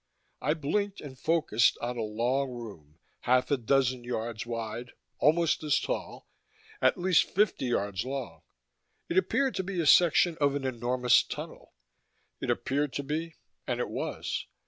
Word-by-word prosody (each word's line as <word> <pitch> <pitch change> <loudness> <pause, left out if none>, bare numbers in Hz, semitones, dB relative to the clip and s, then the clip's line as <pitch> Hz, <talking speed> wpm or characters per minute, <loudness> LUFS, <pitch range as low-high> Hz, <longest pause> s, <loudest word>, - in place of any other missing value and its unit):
I 150 +3 +1
blinked 200 +7 -1
and 140 -3 -9
focused 150 -6 +2
on 120 +1 -4
a 120 - -3
long 120 +6 0
room, 100 -12 -10 0.2
half 125 +3 +2
a - - +5
dozen 130 0 +1
yards 115 -2 -4
wide, 115 +1 -5 0.3
almost 160 +3 +3
as 150 -2 +2
tall, - - -5 0.5
at - - +4
least 180 -1 +3
fifty 200 -8 +1
yards 100 -4 -1
long. 130 -11 -5 0.7
It 180 - +4
appeared 260 +8 0
to 190 - -1
be 190 -1 -4
a 165 - +1
section 170 +1 +5
of 140 -1 +3
an 140 -2 -3
enormous 125 0 +3
tunnel; - - -8 0.6
it - - -4
appeared 145 +1 0
to 140 - -3
be, 155 +3 -3 0.3
and - - -1
it - - -2
was. - - -4
135 Hz, 155 wpm, -29 LUFS, 120-160 Hz, 0.7 s, a